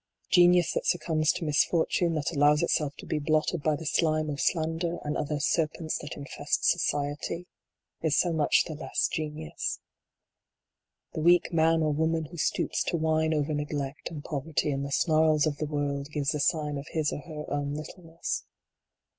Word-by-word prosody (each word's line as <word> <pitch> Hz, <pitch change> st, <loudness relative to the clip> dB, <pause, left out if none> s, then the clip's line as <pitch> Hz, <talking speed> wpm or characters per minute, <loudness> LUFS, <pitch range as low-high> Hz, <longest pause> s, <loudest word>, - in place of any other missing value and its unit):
Genius 175 Hz, -1 st, +5 dB
that -, -, -2 dB
succumbs 160 Hz, -3 st, +2 dB
to 175 Hz, -, -4 dB
misfortune, 165 Hz, +2 st, +2 dB
that 155 Hz, 0 st, -1 dB
allows 150 Hz, 0 st, +4 dB
itself 150 Hz, -4 st, 0 dB
to -, -, -10 dB
be 155 Hz, -, -1 dB
blotted 155 Hz, +2 st, +1 dB
by 155 Hz, +1 st, +1 dB
the 160 Hz, -, -8 dB
slime 155 Hz, -1 st, +1 dB
of 140 Hz, -, -3 dB
slander 165 Hz, +1 st, 0 dB
and 150 Hz, 0 st, -2 dB
other 150 Hz, 0 st, -2 dB
serpents 155 Hz, +2 st, 0 dB
that 145 Hz, -, -7 dB
infest 145 Hz, 0 st, -2 dB
society 150 Hz, +1 st, 0 dB, 0.6 s
is 155 Hz, -3 st, +1 dB
so 175 Hz, -2 st, +2 dB
much 155 Hz, -2 st, +3 dB
the 160 Hz, -, -6 dB
less 150 Hz, -, -1 dB
genius. 150 Hz, -, -4 dB, 1.3 s
The 155 Hz, -, -3 dB
weak 175 Hz, +2 st, +4 dB
man 165 Hz, 0 st, +3 dB
or 155 Hz, -1 st, +1 dB
woman 160 Hz, +1 st, 0 dB
who 170 Hz, +3 st, -11 dB
stoops -, -, 0 dB
to 170 Hz, -, 0 dB
whine 160 Hz, 0 st, +1 dB
over 150 Hz, 0 st, 0 dB
neglect, 145 Hz, -1 st, -3 dB
and 155 Hz, -4 st, -7 dB
poverty, 150 Hz, 0 st, -1 dB
and 135 Hz, 0 st, -2 dB
the 140 Hz, -, -5 dB
snarls 155 Hz, 0 st, +3 dB
of 150 Hz, -2 st, -1 dB
the 155 Hz, -, -2 dB
world, 145 Hz, -1 st, -2 dB
gives 145 Hz, -2 st, -1 dB
the 150 Hz, -, -2 dB
sign 150 Hz, -1 st, 0 dB
of 140 Hz, -, -9 dB
his 155 Hz, -2 st, -1 dB
or -, -, -4 dB
her 150 Hz, -1 st, -7 dB
own 145 Hz, 0 st, -1 dB
littleness. 165 Hz, +2 st, -5 dB
155 Hz, 175 wpm, -28 LUFS, 145-165 Hz, 1.3 s, Genius